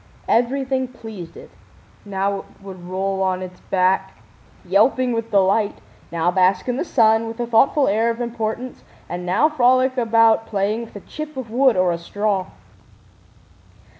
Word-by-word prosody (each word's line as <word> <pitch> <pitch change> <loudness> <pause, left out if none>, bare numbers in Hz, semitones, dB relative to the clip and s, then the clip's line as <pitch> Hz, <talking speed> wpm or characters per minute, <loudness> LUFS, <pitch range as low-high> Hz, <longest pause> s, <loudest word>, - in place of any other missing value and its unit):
Everything 260 +2 +1
pleased 220 -8 -10
it. - - -13 0.5
Now 200 0 -1
it - - -11 0.2
would 185 -3 -10
roll 190 +1 -2
on 185 -1 0
its 180 0 -10
back, 190 0 0 0.5
yelping 230 +7 +2
with 230 0 -3
delight, 200 +1 +2 0.4
now 170 +1 +1
bask 185 +3 +2
in 250 0 -1
the - - -1
sun 225 -7 +3
with 225 +1 -8
a 240 - -1
thoughtful 265 +5 +3
air 220 +3 +2
of 230 0 -3
importance, 235 +1 -4 0.2
and 180 0 -6
now 205 +12 +3
frolic 255 -2 +2
about 225 -1 +3
playing 210 +3 -1
with 225 - -18
a 205 - -8
chip 305 +4 -8
of 240 -4 -6
wood 255 -2 +3
or 185 -1 +3
a 170 - -3
straw. 200 +1 -2
220 Hz, 160 wpm, -21 LUFS, 190-245 Hz, 0.5 s, sun